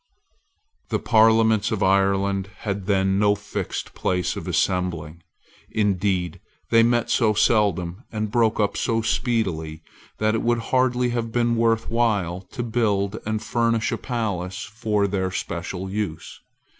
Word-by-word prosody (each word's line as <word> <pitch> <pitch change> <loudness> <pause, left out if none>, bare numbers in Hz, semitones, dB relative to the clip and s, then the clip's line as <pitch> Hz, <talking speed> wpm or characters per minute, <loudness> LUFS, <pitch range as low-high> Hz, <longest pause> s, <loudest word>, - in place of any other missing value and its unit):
The - - +1
Parliaments 110 -1 +4
of 110 -3 0
Ireland 100 0 +2
had 100 -2 -3
then 95 -1 +2
no 105 0 +4
fixed 105 0 -5
place 90 -1 -1
of - - -6
assembling. 85 -4 -1 0.5
Indeed 95 -4 0 0.3
they 115 0 +6
met 120 +1 +2
so 110 -3 +3
seldom 100 -3 +1
and 110 -1 -3
broke 115 -1 +2
up 105 -1 +1
so 115 -2 0
speedily 95 -10 -1 0.3
that 110 0 +1
it 115 - 0
would 120 0 +2 0.2
hardly 125 -1 +2
have 120 -1 -2
been 120 0 +1
worth 115 -1 +1
while 100 -7 0
to 120 - -4
build 110 -3 0
and 110 0 -2
furnish 115 -1 +1
a - - -1
palace 100 -7 -3
for 105 -2 -1
their 95 -1 -1
special 95 +1 -4
use. 95 -5 -5
105 Hz, 140 wpm, -23 LUFS, 95-115 Hz, 0.5 s, they